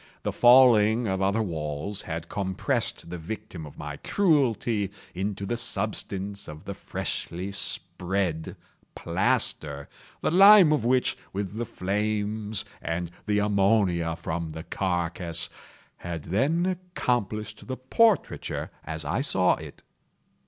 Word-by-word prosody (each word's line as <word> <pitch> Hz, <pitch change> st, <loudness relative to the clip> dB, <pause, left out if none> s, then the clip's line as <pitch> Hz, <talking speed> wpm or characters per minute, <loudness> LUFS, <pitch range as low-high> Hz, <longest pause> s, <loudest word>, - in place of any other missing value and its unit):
The -, -, -1 dB
falling 120 Hz, -2 st, +6 dB
of 95 Hz, -2 st, -1 dB
other 100 Hz, +3 st, +2 dB
walls 80 Hz, +2 st, -4 dB
had 85 Hz, 0 st, -5 dB
compressed 95 Hz, -3 st, -2 dB
the 90 Hz, -, -5 dB
victim 95 Hz, -3 st, -7 dB
of 75 Hz, -, -14 dB
my -, -, -6 dB
cruelty 120 Hz, -, +1 dB, 0.2 s
into 100 Hz, +2 st, -3 dB
the 120 Hz, +4 st, -2 dB
substance 100 Hz, -3 st, -1 dB
of 75 Hz, 0 st, -10 dB
the -, -, -4 dB
freshly 90 Hz, +4 st, -4 dB
spread 90 Hz, -3 st, -1 dB, 0.4 s
plaster; 70 Hz, -2 st, +1 dB, 0.3 s
the -, -, +1 dB
lime 195 Hz, -2 st, +8 dB
of 150 Hz, -, 0 dB
which, 125 Hz, +2 st, +2 dB, 0.2 s
with 100 Hz, 0 st, -3 dB
the 120 Hz, -, -2 dB
flames, 105 Hz, +1 st, -2 dB, 0.2 s
and 85 Hz, +2 st, -3 dB, 0.2 s
the 105 Hz, 0 st, +2 dB
ammonia 100 Hz, -5 st, +2 dB
from 80 Hz, -1 st, -4 dB
the 80 Hz, 0 st, -7 dB
carcass, 85 Hz, -3 st, -1 dB, 0.5 s
had 85 Hz, -3 st, -6 dB
then 140 Hz, -, +1 dB
accomplished 120 Hz, -, -2 dB
the 130 Hz, -1 st, -4 dB
portraiture 220 Hz, -, +1 dB
as -, -, -6 dB
I -, -, 0 dB
saw -, -, +2 dB
it. -, -, -11 dB
100 Hz, 125 wpm, -26 LUFS, 85-115 Hz, 0.5 s, lime